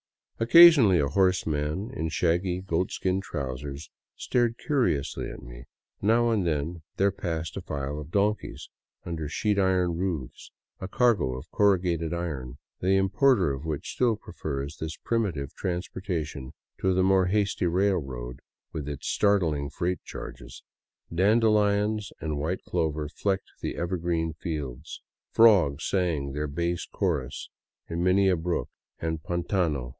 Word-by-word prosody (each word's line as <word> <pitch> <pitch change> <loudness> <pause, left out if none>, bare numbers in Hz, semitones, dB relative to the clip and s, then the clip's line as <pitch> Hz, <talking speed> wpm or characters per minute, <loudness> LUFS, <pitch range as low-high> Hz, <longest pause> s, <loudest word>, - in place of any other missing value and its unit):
Occasionally 125 - +8
a 70 - +2
horseman 90 - 0
in 80 -7 -2
shaggy 90 +2 0
goatskin 95 +1 -1
trousers 70 -2 -5 0.2
stared 120 -2 0
curiously 125 - 0
at - - -9
me; - - -11 0.4
now 115 +3 +3
and 100 -6 +1
then 80 +2 -2 0.2
there 100 +1 +3
passed 85 -4 -4
a - - -3
file 70 +1 -4
of 75 0 -8
donkeys 105 +4 -1 0.4
under 80 -3 -4
sheet 105 +5 0
iron 90 -3 +2
roofs, 85 -9 -4
— - - -55
a 95 - -3
cargo 100 - +2
of 70 +5 -11
corrugated 90 -5 +2
iron, 70 -8 -4 0.2
the 95 +2 +2
importer 95 - +3
of 70 +3 -7
which 75 -3 -4
still 120 -3 +2
prefers 70 -6 -5
this 80 0 -5
primitive 90 - -1
transportation 85 -6 -4 0.3
to 95 -1 +1
the 95 - +3
more 95 -1 +4
hasty 100 -2 +1
railroad 75 -10 -1 0.3
with 75 -2 -4
its 70 - -6
startling 85 -9 +1
freight 90 +3 -2
charges. - - -9 0.5
Dandelions 105 +1 +2
and 75 -2 -3
white 85 +6 -2
clover 75 -1 -1
flecked 95 +5 -2
the - - -3
ever 90 +2 -2
green 80 -1 -1
fields; 75 -4 -6 0.3
frogs 95 -11 +5
sang 85 -8 0
their 75 +2 -2
bass 85 +4 -2
chorus 65 - -2 0.4
in 85 +1 -2
many 95 +2 +4
a 95 - +4
brook 85 +1 -2 0.3
and 80 -1 -2
pdntano. 85 -6 -1
85 Hz, 140 wpm, -27 LUFS, 75-95 Hz, 0.5 s, Occasionally